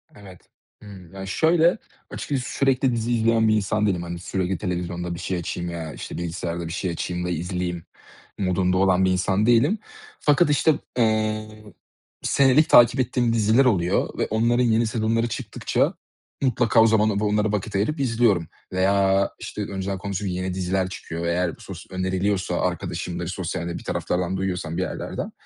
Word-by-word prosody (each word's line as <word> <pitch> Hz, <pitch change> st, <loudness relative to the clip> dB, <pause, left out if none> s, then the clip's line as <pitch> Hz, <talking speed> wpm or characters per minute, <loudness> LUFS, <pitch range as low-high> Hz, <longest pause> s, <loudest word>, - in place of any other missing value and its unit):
Evet. 95 Hz, -3 st, -13 dB, 0.4 s
Hımm. 95 Hz, -4 st, -12 dB
Ya, 95 Hz, 0 st, -7 dB
şöyle, 165 Hz, -, +3 dB, 0.3 s
açıkçası 135 Hz, -4 st, -3 dB
sürekli 135 Hz, -1 st, +2 dB
dizi 115 Hz, +1 st, -2 dB
izleyen 115 Hz, -1 st, +3 dB
bir 110 Hz, -, +4 dB
insan 105 Hz, +1 st, 0 dB
değilim, 90 Hz, -4 st, 0 dB
hani, 85 Hz, 0 st, -6 dB
sürekli 95 Hz, +1 st, -2 dB
televizyonda 90 Hz, -1 st, -3 dB
bir -, -, -8 dB
şey 95 Hz, -, -2 dB
açayım 85 Hz, +1 st, -4 dB
veya 80 Hz, -3 st, -5 dB
işte -, -, -7 dB
bilgisayarda 85 Hz, 0 st, -4 dB
bir 80 Hz, -, -5 dB
şey 95 Hz, 0 st, -2 dB
açayım 90 Hz, +1 st, -3 dB
da -, -, -2 dB
izleyeyim 90 Hz, 0 st, -3 dB, 0.5 s
modunda 90 Hz, -1 st, +1 dB
olan 95 Hz, -1 st, +3 dB
bir 95 Hz, -, +2 dB
insan 95 Hz, +3 st, +1 dB
değilim 125 Hz, -, +3 dB, 0.4 s
fakat 150 Hz, +2 st, +3 dB
işte, 150 Hz, +2 st, +4 dB, 0.2 s
eee, 110 Hz, -2 st, +1 dB, 0.7 s
senelik 140 Hz, +3 st, +4 dB
takip 120 Hz, +2 st, +7 dB
ettiğim 120 Hz, -2 st, +1 dB
diziler 115 Hz, +4 st, +4 dB
oluyor 90 Hz, -8 st, +1 dB
ve -, -, 0 dB
onların 115 Hz, +3 st, +2 dB
yeni 115 Hz, -1 st, +2 dB
sezonları 115 Hz, +1 st, 0 dB
çıktıkça 115 Hz, -, -1 dB, 0.5 s
mutlaka 120 Hz, -3 st, +3 dB
o 115 Hz, -, +6 dB
zamanlarda 110 Hz, -2 st, +2 dB
onlara 105 Hz, 0 st, +1 dB
vakit 105 Hz, 0 st, -3 dB
ayırıp 110 Hz, +11 st, 0 dB
izliyorum 115 Hz, -, +2 dB, 0.3 s
veya 95 Hz, +1 st, +3 dB
işte -, -, -6 dB
önceden 95 Hz, 0 st, -4 dB
konuştuğum 100 Hz, +1 st, -4 dB
yeni 90 Hz, 0 st, -2 dB
diziler 95 Hz, 0 st, -1 dB
çıkıyor 85 Hz, -2 st, -6 dB
ve 85 Hz, -, 0 dB
eğer 90 Hz, -1 st, 0 dB
bu -, -, -17 dB
sos -, -, -9 dB
öneriliyorsa 95 Hz, 0 st, -1 dB
arkadaşımdır, 90 Hz, 0 st, -3 dB
sosyalde 85 Hz, -1 st, -4 dB
bir -, -, -10 dB
taraflardan 90 Hz, +1 st, -2 dB
duyuyorsam 90 Hz, -3 st, -3 dB
bir -, -, 0 dB
yerlerden, 90 Hz, -, -4 dB
95 Hz, 165 wpm, -23 LUFS, 90-115 Hz, 0.7 s, takip